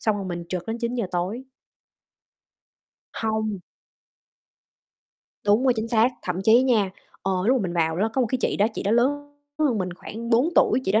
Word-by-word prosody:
xong 215 -2 +1
rồi 200 - -4
mình 175 -2 -5
trực 180 -2 -4
đến 225 +1 -3
9:00 235 -1 -2
tối. 185 +8 -2 1.7
Hông. 220 -2 -2 1.9
Đúng 210 +5 +3
rồi, 255 - +5
chính 220 +1 -2
xác, 230 +1 +4
thậm 180 -1 -3
chí 230 +4 +6
nha, 220 -7 +2 0.3
ờ, 195 - 0
lúc 260 +2 +4
mà 225 - -2
mình 180 - -3
vào 160 -1 0
ló 210 +4 +1
có 265 - 0
một 250 - +2
cái 255 - 0
chị - - 0
đó, 205 - +3
chị - - -3
đó 200 - 0
lớn 290 +5 +1 0.3
hơn 275 -8 +2
mình 180 -1 -2
khoảng 230 +6 -7
4 245 +6 +4
tuổi, - - +4
chị 190 - 0
đó 215 - +4
220 Hz, 195 wpm, -24 LUFS, 195-245 Hz, 1.9 s, chí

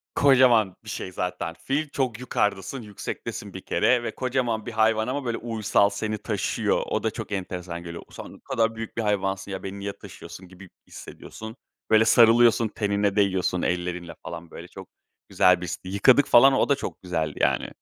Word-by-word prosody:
Kocaman 125 -8 +4
bir - - -10
şey 95 - -5
zaten 90 -2 -4
fil, 135 - -3
çok 125 -5 -2
yukardasın, 105 0 -2
yüksektesin 105 -2 -7
bir - - -7
kere 125 -2 +1
ve - - -5
kocaman 125 -4 -1
bir 120 - -5
hayvan 110 0 +2
ama, 135 +1 -3
böyle, 120 -1 -2
uysal 110 -3 +1
seni 105 +1 -3
taşıyor. 105 -3 -1
O - - -2
da - - 0
çok - - -7
enteresan 90 -3 -5
geliyor. 85 -1 -8
Sen - - -10
ne - - -17
kadar 115 0 -1
büyük 115 0 -7
bir 115 - +1
hayvansın 95 -2 -1
ya, 95 - -5
beni 100 +1 -6
niye 100 0 -4
taşıyorsun 95 - -11
gibi 95 +1 -14 0.2
hissediyorsun. 110 +1 -10 0.3
Böyle 110 0 +5
sarılıyorsun 115 0 +5
tenine 100 -1 -1
değiyorsun 95 -3 +1
ellerinle, 90 -1 -3
falan, 85 0 -8
böyle, - - -10
çok - - -12 0.4
güzel 90 -1 +4
bir 90 - -4
histi. 90 - -6
Yıkadık, 125 +8 +4
falan, 135 +3 +7
o 135 - +2
da 140 - +4
çok 140 - -7
güzeldi, 80 -5 -3
yani. - - +1
105 Hz, 180 wpm, -25 LUFS, 95-115 Hz, 0.4 s, falan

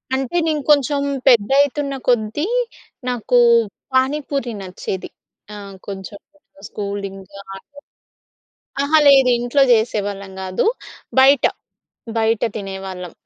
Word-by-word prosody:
అంటే, 265 +4 -2
నేను 305 -2 0
కొంచెం 285 0 +2 0.3
పెద్దయితున్న 275 +4 +3
కొద్దీ 240 - +1 0.6
నాకు 245 0 0 0.6
పానీపూరి 270 -1 0
నచ్చేది. 185 0 -6 0.4
ఆహ్, 200 -1 -9
కొంచెం 195 0 -8 0.5
స్కూలింగు 200 -2 -6 0.2
ఆ - - -7
టైమ్. 285 0 -18 1.0
అహా! 305 +3 +3
లేదు 270 -2 +6
ఇంట్లో 245 +4 +1
చేసేవాళ్ళం 205 -4 -1
కాదు. 185 0 -2 0.5
బయట, 270 +1 +5 0.7
బయట 225 0 +1
తినేవాళ్ళం. 190 -3 -7
235 Hz, 95 wpm, -19 LUFS, 200-275 Hz, 1.0 s, లేదు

